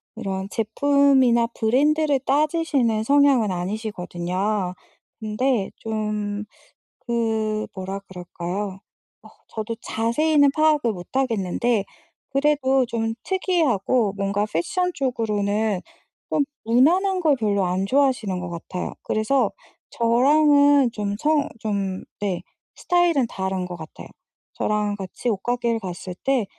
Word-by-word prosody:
이런 195 Hz, -3 st, -4 dB
제품이나 255 Hz, +1 st, +3 dB
브랜드를 290 Hz, +5 st, +2 dB
따지시는 275 Hz, -5 st, +1 dB
성향은 275 Hz, -3 st, +4 dB
아니시거든요. 185 Hz, 0 st, -2 dB, 0.5 s
근데 220 Hz, 0 st, 0 dB
좀 210 Hz, -1 st, -3 dB, 0.6 s
그 220 Hz, -2 st, 0 dB
뭐라 190 Hz, +1 st, -5 dB
그럴까요? 190 Hz, +1 st, -6 dB, 0.4 s
어 -, -, -14 dB, 0.2 s
저도 220 Hz, +1 st, -5 dB
자세히는 285 Hz, +6 st, +2 dB
파악을 305 Hz, -6 st, +3 dB
못 180 Hz, -4 st, -8 dB
하겠는데 230 Hz, -3 st, 0 dB, 0.5 s
그래도 275 Hz, -2 st, +2 dB
좀 225 Hz, -2 st, -2 dB
특이하고 255 Hz, -, +1 dB
뭔가 200 Hz, +1 st, 0 dB
패션 360 Hz, -, 0 dB
쪽으로는 215 Hz, -5 st, 0 dB, 0.5 s
좀 295 Hz, -, +2 dB, 0.2 s
무난한 355 Hz, -, +3 dB
걸 305 Hz, -5 st, +3 dB
별로 205 Hz, -4 st, +1 dB
안 180 Hz, +2 st, 0 dB
좋아하시는 250 Hz, -6 st, +1 dB
것 180 Hz, -, -5 dB
같아요. 175 Hz, +1 st, -5 dB
그래서 235 Hz, +5 st, +1 dB, 0.4 s
저랑은 285 Hz, +2 st, +4 dB
좀 205 Hz, -2 st, -3 dB
성 295 Hz, +3 st, +2 dB
좀 200 Hz, -3 st, -2 dB, 0.2 s
네 195 Hz, -4 st, -2 dB, 0.3 s
스타일은 345 Hz, -8 st, +2 dB
다른 190 Hz, -3 st, -3 dB
것 180 Hz, -1 st, -7 dB
같아요. 160 Hz, -1 st, -10 dB, 0.4 s
저랑 210 Hz, -1 st, -1 dB
같이 195 Hz, +5 st, -4 dB
옷가게를 235 Hz, +2 st, -1 dB
갔을 185 Hz, -1 st, -6 dB
때 270 Hz, -5 st, +2 dB
225 Hz, 255 characters per minute, -23 LUFS, 200-275 Hz, 0.6 s, 성향은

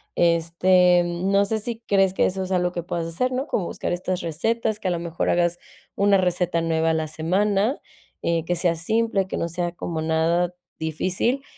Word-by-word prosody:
este, 175 Hz, +2 st, +4 dB
no 190 Hz, +4 st, +1 dB
sé 220 Hz, +2 st, -1 dB
si 225 Hz, +1 st, -4 dB
crees 195 Hz, -2 st, +3 dB
que -, -, +3 dB
eso 190 Hz, 0 st, -2 dB
es 185 Hz, -, -6 dB
algo 180 Hz, -1 st, +1 dB
que 175 Hz, -, -4 dB
puedas 170 Hz, -1 st, -3 dB
hacer, 250 Hz, +10 st, -1 dB
¿no?, 260 Hz, +2 st, -1 dB
como 185 Hz, -, -1 dB
buscar -, -, -4 dB
estas 180 Hz, +1 st, -2 dB
recetas 220 Hz, +7 st, -1 dB
que -, -, -3 dB
a -, -, +1 dB
lo 175 Hz, -, -1 dB
mejor 170 Hz, 0 st, -2 dB
hagas 175 Hz, 0 st, +1 dB, 0.4 s
una 200 Hz, 0 st, +4 dB
receta 180 Hz, -2 st, 0 dB
nueva 165 Hz, 0 st, +1 dB
a -, -, +1 dB
la 160 Hz, -1 st, -1 dB
semana, 195 Hz, -, 0 dB, 0.4 s
eh, 165 Hz, -1 st, +1 dB
que 175 Hz, -, 0 dB
sea 175 Hz, 0 st, +2 dB
simple, 200 Hz, +3 st, 0 dB
que -, -, -4 dB
no 170 Hz, -, -2 dB
sea 175 Hz, +1 st, -2 dB
como 170 Hz, -2 st, -4 dB
nada 165 Hz, +2 st, +1 dB, 0.3 s
difícil 185 Hz, -, -1 dB
180 Hz, 195 wpm, -23 LUFS, 170-195 Hz, 0.4 s, este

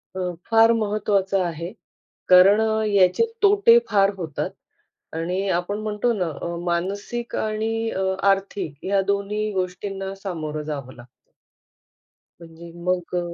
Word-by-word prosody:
अ, -, -, -4 dB, 0.3 s
फार 225 Hz, 0 st, +6 dB
महत्वाचं 205 Hz, -3 st, 0 dB
आहे, 170 Hz, +1 st, -5 dB, 0.6 s
कारण 185 Hz, +3 st, +7 dB
अ, 220 Hz, 0 st, +1 dB
याचे 200 Hz, -, +3 dB, 0.2 s
तोटे 405 Hz, -, +6 dB
फार 200 Hz, -2 st, +3 dB
होतात. 165 Hz, -6 st, -4 dB, 0.7 s
आणि 180 Hz, +4 st, -2 dB
आपण 200 Hz, +4 st, -3 dB
म्हणतो 215 Hz, +3 st, 0 dB
ना 185 Hz, -6 st, -1 dB
अ, 170 Hz, -, -3 dB
मानसिक 200 Hz, +7 st, -3 dB
आणि 220 Hz, +1 st, -1 dB
अ, 190 Hz, -, -2 dB, 0.3 s
आर्थिक 195 Hz, -6 st, -2 dB
या 195 Hz, 0 st, +2 dB
दोन्ही 210 Hz, +2 st, -2 dB
गोष्टींना 190 Hz, +1 st, -4 dB
सामोरं 160 Hz, -6 st, -5 dB
जावं 140 Hz, -4 st, -6 dB
लागतं. 120 Hz, 0 st, -14 dB, 1.3 s
म्हणजे 165 Hz, 0 st, -12 dB
मग 180 Hz, -1 st, -1 dB
अ -, -, +2 dB
195 Hz, 125 wpm, -23 LUFS, 175-215 Hz, 1.3 s, कारण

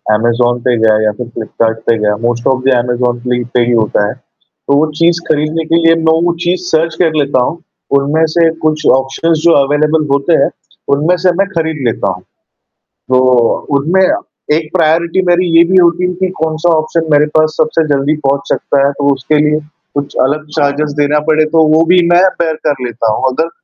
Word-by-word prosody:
Amazon 120 Hz, +2 st, 0 dB
पे 125 Hz, -, +2 dB
गया 110 Hz, -1 st, +3 dB
या 105 Hz, -, +1 dB
फिर 125 Hz, -, -5 dB
फ़्लिपकार्ट 110 Hz, 0 st, -2 dB
पे 115 Hz, -, +2 dB
गया। 105 Hz, -1 st, 0 dB
मोस्ट 120 Hz, 0 st, -1 dB
ऑफ़ 130 Hz, -1 st, 0 dB
दी 135 Hz, -, +3 dB
अमेज़न 120 Hz, 0 st, -2 dB
पे 125 Hz, -, +2 dB
ही 120 Hz, -, -1 dB
होता 110 Hz, -3 st, +1 dB
है। -, -, -4 dB
तो 140 Hz, -, -7 dB
वो 155 Hz, -, +3 dB
चीज़ 170 Hz, 0 st, +2 dB
खरीदने 155 Hz, +2 st, 0 dB
के 165 Hz, -, 0 dB
लिए 165 Hz, 0 st, +5 dB
मैं 160 Hz, -1 st, +1 dB
वो 175 Hz, -, +1 dB
चीज़ 175 Hz, +1 st, -1 dB
सर्च 160 Hz, 0 st, 0 dB
कर 165 Hz, -3 st, +2 dB
लेता 140 Hz, -3 st, 0 dB
हूँ। 160 Hz, -, -3 dB, 0.4 s
उनमें 150 Hz, +4 st, +1 dB
से 165 Hz, -1 st, +4 dB, 0.2 s
कुछ 155 Hz, 0 st, 0 dB
ऑप्शंस 135 Hz, +5 st, -1 dB
जो 170 Hz, -, +4 dB
अवेलेबल 150 Hz, +2 st, 0 dB
होते 140 Hz, +4 st, +1 dB
हैं, -, -, 0 dB, 0.5 s
उनमें 155 Hz, +5 st, +1 dB
से 185 Hz, -, +4 dB
मैं 195 Hz, -, +2 dB
खरीद 160 Hz, -5 st, -3 dB
लेता 100 Hz, -4 st, -1 dB
हूँ। 90 Hz, -, -11 dB, 0.7 s
तो 130 Hz, 0 st, -2 dB, 0.6 s
उनमें 170 Hz, +7 st, +1 dB, 0.6 s
एक 160 Hz, -1 st, -5 dB
प्रायोरिटी 170 Hz, +2 st, +1 dB
मेरी 175 Hz, +1 st, +2 dB
ये 170 Hz, -, +7 dB
भी 190 Hz, -, +4 dB
होती 175 Hz, +1 st, +2 dB
है 180 Hz, -, -3 dB
कि, 185 Hz, +1 st, -2 dB
कौन-सा 160 Hz, +2 st, 0 dB
ऑप्शन 155 Hz, +1 st, -1 dB
मेरे 145 Hz, 0 st, +4 dB
पास 155 Hz, 0 st, +2 dB
सबसे 155 Hz, 0 st, 0 dB
जल्दी 140 Hz, +3 st, 0 dB
पहुँच 140 Hz, +1 st, -1 dB
सकता 140 Hz, -1 st, 0 dB
है, 140 Hz, -, +1 dB
तो 140 Hz, 0 st, 0 dB
उसके 135 Hz, +3 st, -1 dB
लिए 150 Hz, 0 st, +1 dB, 0.4 s
कुछ 145 Hz, 0 st, -4 dB
अलग 150 Hz, +4 st, -1 dB
चार्जर्स 145 Hz, +1 st, 0 dB
देना 145 Hz, +1 st, +1 dB
पड़े, 155 Hz, 0 st, +3 dB
तो 160 Hz, +1 st, +2 dB
वो 160 Hz, -, +4 dB
भी 180 Hz, +2 st, +4 dB
मैं 175 Hz, +1 st, +4 dB, 0.2 s
बेयर 160 Hz, -2 st, 0 dB
कर 140 Hz, -4 st, -1 dB
लेता 115 Hz, -2 st, -2 dB
हूँ -, -, -4 dB
अगर 160 Hz, +6 st, -2 dB
150 Hz, 200 wpm, -12 LUFS, 130-165 Hz, 0.7 s, ये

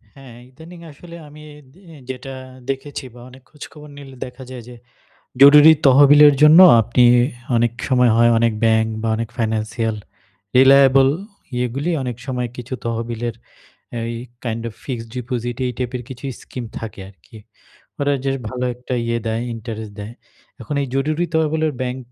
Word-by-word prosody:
হ্যাঁ, 135 Hz, -4 st, -14 dB
ইদানিং 160 Hz, +6 st, -14 dB
আসলে 170 Hz, +4 st, -13 dB
আমি 150 Hz, +1 st, -14 dB, 0.3 s
দি 180 Hz, -, -21 dB, 0.3 s
যেটা 130 Hz, +1 st, -7 dB, 0.4 s
দেখেছি 135 Hz, 0 st, -5 dB
বা 120 Hz, -, -14 dB
অনেক 130 Hz, +1 st, -16 dB
খোঁজখবর 150 Hz, 0 st, -13 dB
নিলে 135 Hz, -2 st, -12 dB
দেখা 125 Hz, +1 st, -11 dB
যায় 125 Hz, -2 st, -9 dB
যে, 125 Hz, -, -11 dB, 0.7 s
জরুরি 150 Hz, +3 st, +9 dB
তহবিলের 145 Hz, +2 st, +7 dB
জন্য 155 Hz, +3 st, +8 dB, 0.2 s
আপনি 120 Hz, +3 st, +1 dB, 0.5 s
অনেক 115 Hz, 0 st, +1 dB, 0.2 s
সময় 125 Hz, -3 st, +3 dB
হয় 120 Hz, 0 st, +4 dB
অনেক 115 Hz, 0 st, +2 dB
ব্যাংক 110 Hz, 0 st, +2 dB
বা 115 Hz, -, -1 dB
অনেক 115 Hz, 0 st, -4 dB
ফাইন্যান্সিয়াল 110 Hz, 0 st, -2 dB, 0.6 s
রিলায়েবল 135 Hz, 0 st, +6 dB, 0.5 s
ইয়েগুলি 125 Hz, +6 st, -2 dB
অনেক 125 Hz, -3 st, -5 dB
সময় 125 Hz, -2 st, -3 dB
কিছু 125 Hz, +1 st, -7 dB
তহবিলের 115 Hz, 0 st, -4 dB, 0.7 s
এই 115 Hz, +1 st, -4 dB, 0.3 s
কাইন্ড 115 Hz, -1 st, -3 dB
অফ 110 Hz, -, -12 dB
ফিক্সড 115 Hz, -4 st, -6 dB
ডিপোজিট 120 Hz, -1 st, -4 dB
এই 125 Hz, -, -3 dB
টাইপের 125 Hz, -1 st, -4 dB
কিছু 130 Hz, 0 st, -11 dB, 0.2 s
স্কিম 125 Hz, -, -8 dB
থাকে 110 Hz, -3 st, -8 dB
আরকি। 95 Hz, +3 st, -18 dB, 0.6 s
ওরা 145 Hz, 0 st, +1 dB
জাস্ট 135 Hz, -1 st, -2 dB
ভালো 125 Hz, 0 st, -4 dB
একটা 125 Hz, +1 st, -6 dB
ইয়ে 115 Hz, 0 st, -1 dB
দেয়, 110 Hz, +1 st, -2 dB
ইন্টারেস্ট 110 Hz, -2 st, -8 dB
দেয়। 105 Hz, +3 st, -8 dB, 0.5 s
এখন 150 Hz, -, -6 dB
এই 140 Hz, -, -3 dB
জরুরি 155 Hz, +5 st, -1 dB
তহবিলের 160 Hz, -1 st, 0 dB
ব্যাংক 125 Hz, 0 st, -4 dB
125 Hz, 150 wpm, -19 LUFS, 115-140 Hz, 0.7 s, জরুরি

